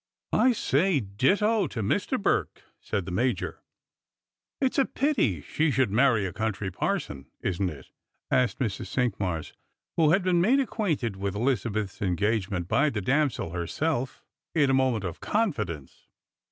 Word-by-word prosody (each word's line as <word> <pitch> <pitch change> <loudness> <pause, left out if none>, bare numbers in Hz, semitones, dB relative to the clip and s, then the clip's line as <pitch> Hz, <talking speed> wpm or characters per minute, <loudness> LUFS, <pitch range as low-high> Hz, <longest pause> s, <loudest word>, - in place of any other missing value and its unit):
" - - -41
I 255 - +5
say 170 - +2
ditto 190 - +2
to 115 -5 -4
Mr. - - 0
Burke," - - 0 0.2
said 100 -4 -3
the 95 - -5
Major. 110 +1 -1 1.0
"It's 265 0 +1
a 270 - +4
i^ity 215 - 0
she 160 +1 0
should 130 -5 +2
marry 115 -2 +3
a 95 - -4
country 110 -3 -2
parson, 70 -5 -3
isn't 95 +1 -1
it^ 70 -5 -11 0.2
" - - -50
asked 125 -1 +2
Mrs. 110 -7 -2
Cinqmars, 95 - -1 0.4
who 160 -3 +5
had 185 +4 +3
been 180 -2 +3
made 245 +10 +4
acquainted 160 - -1
with 100 0 -3
Elizabeth's 110 -4 -1
engagement 100 -1 0
by 145 +10 +3
the 110 - -3
damsel 135 - 0
herself, 125 - -2 0.3
in 145 -4 +4
a - - +2
moment 130 -5 +2
of 90 -2 -5
confidence. 105 - -2
120 Hz, 155 wpm, -27 LUFS, 95-155 Hz, 1.0 s, I